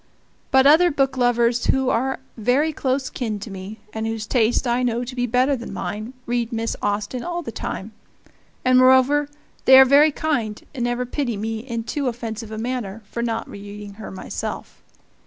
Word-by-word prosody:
But 265 0 +5
other 320 +5 +7
booklovers 245 -4 +1
who 265 -1 +2
are 265 +4 -1
very 260 +8 +1
close 265 -1 -1
kin 225 -6 -3
to 210 - -7
me, 195 +3 -8
and 220 0 -3
whose 225 -1 -3
taste 230 +3 +2
I 240 +1 +1
know 240 -1 0
to 250 +1 -7
be 245 -1 0
better 255 +4 +2
than 235 -2 -7
mine, 215 +4 -5
read 240 0 -1
Miss 230 0 -2
Austen 205 +4 -2
all 345 0 -3
the 230 - -6
time 210 0 -5 0.7
and, 255 0 +5
moreover, 260 +3 +5 0.4
they 265 - +9
are 265 - +10
very 285 +4 +6
kind, 255 -9 -1
and 245 -4 -2
never 240 +1 -1
pity 250 -3 -2
me 220 +2 -3
in 230 -1 -4
too 280 +4 -2
offensive 230 -2 -4
a 220 - -6
manner 225 -3 -4
for 235 - -3
not 230 -1 -2
reading 205 0 -9
her - - -7
myself. 190 - -6
240 Hz, 180 wpm, -22 LUFS, 225-265 Hz, 0.7 s, are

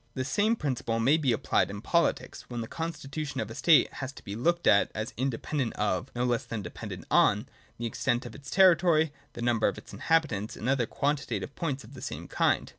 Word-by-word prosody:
The 130 - -2
same 205 - +2
principle 125 - -2
may 130 +7 +4
be 145 -5 0
apphed 115 - +1
in 100 +1 -6
politics, 170 +10 0
when 120 -1 -4
the 115 - -5
constitution 155 -3 -4
of 110 -2 -3
a - - -5
state 160 +5 +4
has 130 -1 -5
to - - -13
be 100 - -6
looked 170 +9 +1
at 100 - +5
as 110 +3 -4
independent 130 +1 -2
of, 100 -4 -1
no 120 - 0
less 120 -1 +1
than 115 -2 -5
as - - -9
dependent 90 - -7
on, - - +4 0.3
the 120 - -4
extent 120 +2 -1
of - - -8
its 140 0 -10
territory, 170 -5 +5 0.2
the 120 - -6
number 120 -2 +2
of - - -2
its - - -11
inhabitants, 145 -11 0
and 115 - -4
other 130 -3 +2
quantitative 145 +1 -2
points 145 -4 -3
of - - -14
the 130 - -10
same - - -6
kind. - - +1
130 Hz, 215 wpm, -29 LUFS, 115-155 Hz, 0.3 s, at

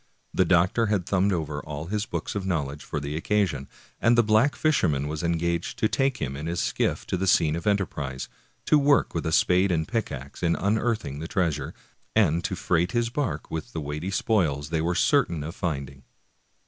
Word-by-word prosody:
The 95 - +3
doctor 90 +6 +3
had 100 -4 0
thumbed 100 +1 +2
over 75 -4 -2
all 75 +1 -6
his 105 +4 -2
books - - -4
of 100 - -3
knowledge 75 -6 -2
for 75 - -4
the 70 +1 -4
occasion, 80 -6 0 0.3
and 120 0 +4
the 120 - +6
black 110 +6 +3
fisher 155 - +2
man 70 0 -1
was 75 +2 -3
engaged 85 0 -1
to 110 - +2
take 135 +3 +1
them 70 0 -3
in 75 +3 -5
his 85 +1 -2
skiff - - 0
to - - -2
the 95 +2 -1
scene 80 -4 +4
of 85 +2 -5
enterprise, 75 -10 -1 0.4
to 150 - +5
work 145 0 +3
with 80 -1 -2
spade 90 +4 +3
and 80 -2 0
pickax 70 - -4
in 85 -1 +2
unearthing 105 - -1
the 80 - -5
treasure, 85 -6 -1 0.4
and 85 -6 +3
to 95 - -1
freight 85 0 0
his 120 0 0
bark 120 - -3
with 80 -2 -5
the 80 - -3
weighty 75 +4 -4
spoils 85 - 0
they 80 -1 +1
were 85 +2 0
certain 90 - +2
of 80 +3 -5
finding. 70 -7 -4
85 Hz, 200 wpm, -26 LUFS, 75-105 Hz, 0.4 s, the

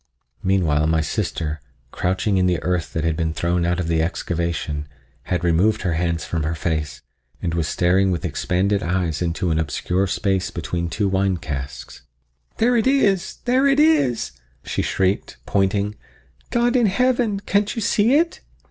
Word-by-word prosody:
Meanwhile 80 -6 +2
my 80 0 +2
sister, 75 0 -2 0.3
crouching 95 +2 0
in 90 0 +3
the 90 -1 +2
earth 90 0 -1
that 80 - -1
had 80 -1 +1
been 80 -1 -2
thrown 85 0 0
out 90 +1 0
of 90 - -2
the 80 -1 +1
excavation, 85 -3 -2 0.4
had 90 -2 -1
removed 90 +6 +2
her 90 -3 0
hands 85 0 -1
from 85 - -2
her 80 +2 -1
face 80 -5 -3 0.4
and 85 - -2
was 85 -1 0
staring 95 +2 +2
with 90 -2 -1
expanded 100 +3 0
eyes 85 -4 -1
into 85 0 -1
an 80 - +1
obscure 90 +5 -1
space 95 0 0
between 85 0 -3
two 100 +4 0
wine 95 -1 +1
casks. 70 -5 -6 0.6
"There 245 +2 +3
it 230 +1 +2
is!—there 250 +2 +2
it 275 +1 +3
is!" 130 - +3 0.3
she - - -2
shrieked, 95 +1 -1
pointing; 100 +1 +1 0.6
"God 240 +1 +1
in 240 -3 +4
heaven! 240 -1 +1
can't 205 +1 0
you 225 - -2
see 220 +5 +3
it?" 335 +3 +1
90 Hz, 165 wpm, -22 LUFS, 80-110 Hz, 0.6 s, in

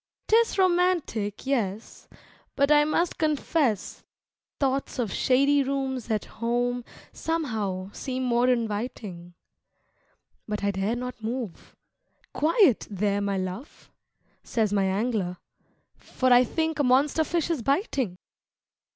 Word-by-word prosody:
'Tis 455 0 +3
romantic, 350 - +1
yes, 225 -6 -2 0.5
but 280 +1 +2
I 295 0 +6
must 335 +3 0
confess 300 - 0 0.6
Thoughts 275 -1 -1
of 230 -7 -1
shady 280 +2 +3
rooms 265 -3 -2
at 215 -2 0
home 245 +1 -1 0.3
somehow 215 - -2
seem 260 +2 -4
more 245 0 +2
inviting. 210 -7 -3 1.1
But 210 -1 -3
I 200 - +2
dare 195 +4 -1
not 250 -1 -6
move 230 -3 -5 0.6
"Quiet, 325 - +3
there, 205 0 0
my 200 -1 -1
love!" 185 - -6 0.5
Says 220 -4 0
my 200 -1 +2
Angler, 195 -2 -1 0.6
"for 255 -1 +1
I 245 +1 +6
think 320 +3 -2
a - - +3
monster 275 +5 +3
fish 340 +1 -1
is 310 -7 -1
biting." 275 - 0
245 Hz, 115 wpm, -26 LUFS, 210-285 Hz, 1.1 s, I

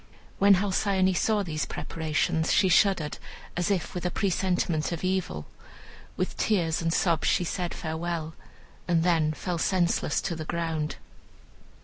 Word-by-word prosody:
When 200 0 +7
Halcyone 190 0 +1
saw 210 +2 +2
these 155 -4 -3
preparations 160 +1 -1
she 190 - +4
shuddered, 180 -5 +3 0.4
as 175 +1 0
if 190 -5 -1
with 180 - -4
a 180 - +1
presentiment 180 -4 0
of 170 0 -4
evil. 185 - -1 0.7
With 185 - -2
tears 170 -7 +1
and 165 0 0
sobs 165 -1 +1
she - - +3
said 175 0 -3
farewell, 160 0 -3 0.5
and 170 -2 +2
then 165 -3 +2
fell 175 +2 -3
senseless 175 -4 +1
to 175 - -3
the 160 - -5
ground. 160 -2 -2
175 Hz, 140 wpm, -27 LUFS, 160-185 Hz, 0.7 s, When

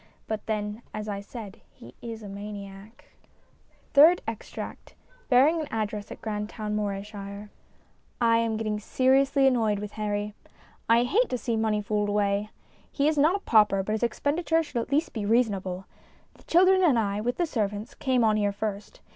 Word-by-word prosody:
But 220 -1 -4
then, 210 0 -3
as 215 0 -5
I 200 -1 -3
said, 205 -1 -9
he 120 +2 -15
is 225 -2 -7
a - - -7
maniac. 200 +4 -9 0.9
THIRD 315 +5 +7
EXTRACT 225 -2 -7 0.3
{Bearing 285 +6 +5
an 305 - -5
Address 215 -1 -3
at - - -9
Grandtoivn^ 210 0 -4
Morayshire) 205 0 -5 0.7
I 230 -1 +4
AM 225 -1 0
getting 215 -1 -2
seriously 270 +4 +3
annoyed 225 -5 +3
with 210 0 -6
Harry. 210 -1 -3 0.6
I 230 +1 +5
hate 445 - +2
to 250 - -1
see 235 -1 -2
money 215 -1 0
fooled 210 0 0
away. 205 0 0 0.4
He 285 0 +1
is 305 -1 +2
not 315 +6 +4
a - - -1
pauper, 210 -3 +4
but 215 - -4
his 215 - -1
expenditure 315 +8 +1
should 245 -6 -3
at 230 - -8
least 315 +4 +1
be 220 - -3
reasonable. 200 -5 0 0.5
The - - -22
children 375 +2 +5
and 295 -9 +4
I, 205 -2 0
with 245 +3 -2
the 350 - +1
servants, 210 -6 -3
came 255 -3 +1
on 215 -1 +3
here 205 -1 +1
first. 210 - -5
215 Hz, 170 wpm, -27 LUFS, 205-255 Hz, 0.9 s, THIRD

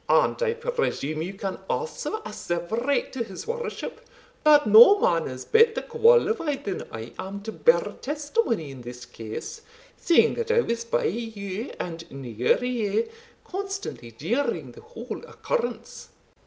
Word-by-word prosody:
"And - - +3
I 465 -2 +2
presume 465 - -2
you 185 +4 -4
can 195 -1 -4
also 460 -2 -2
asseverate 215 +8 -1
to 255 -3 -1
his 195 -4 -8
worship, 475 +1 -5 0.4
that 295 -2 +6
no 230 - +9
man 165 - +2
is 130 -1 -7
better 450 0 +5
qualified 455 - +3
than 195 - -4
I 115 +1 -7
am 200 +1 -5
to 220 - -4
bear 485 - +4 0.2
testimony 290 - -1
in 130 -2 -10
this 120 0 -9
case, 120 - -7 0.4
seeing 340 - +4
that 465 -1 -3
I 470 0 +4
was 235 - -2
by 230 - 0
you, 215 0 -4
and 165 -1 -6
near 125 - 0
you, 225 -3 0 0.4
constantly 390 - -5
during 200 - -2
the 450 - -14
whole 455 +2 -7
occurrence." 485 0 -4
235 Hz, 140 wpm, -26 LUFS, -, 0.4 s, no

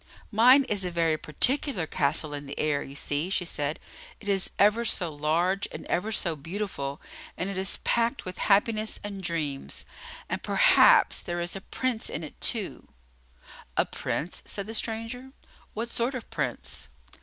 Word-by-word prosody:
"Mine 250 +6 +7
is 205 -6 +1
a 180 - -1
very 165 -2 +2
particular 215 - 0
castle 150 0 +1
in 145 -1 -6
the 140 - -7
air, 150 -2 +1
you 140 - -8
see," 145 +4 -1
she 190 -2 0
said. 150 -2 -2 0.4
"It 205 - -12
is 195 -2 +2
ever 210 +3 +4
so 175 -8 0
large 170 +7 +1
and - - -7
ever 210 +5 -1
so 170 -6 +1
beautiful, 155 -3 -4 0.4
and 190 +2 -2
it - - -5
is 190 +1 +2
packed 235 +3 +1
with 185 - -6
happiness 215 +2 +2
and 200 -2 -6
dreams, 160 -6 -3 0.4
and - - -3
perhaps - - +5
there 175 0 -3
is 175 +2 -1
a 195 - -5
Prince 250 +2 -2
in 160 - -4
it, 150 - -10
too." - - -1 0.9
"A - - +4
Prince?" 170 +4 -3
said 200 - -1
the 220 - -6
stranger. 230 +4 -3 0.4
"What 235 +2 -3
sort 240 +3 0
of 250 - -6
Prince?" - - -3
190 Hz, 165 wpm, -27 LUFS, 155-225 Hz, 0.9 s, Mine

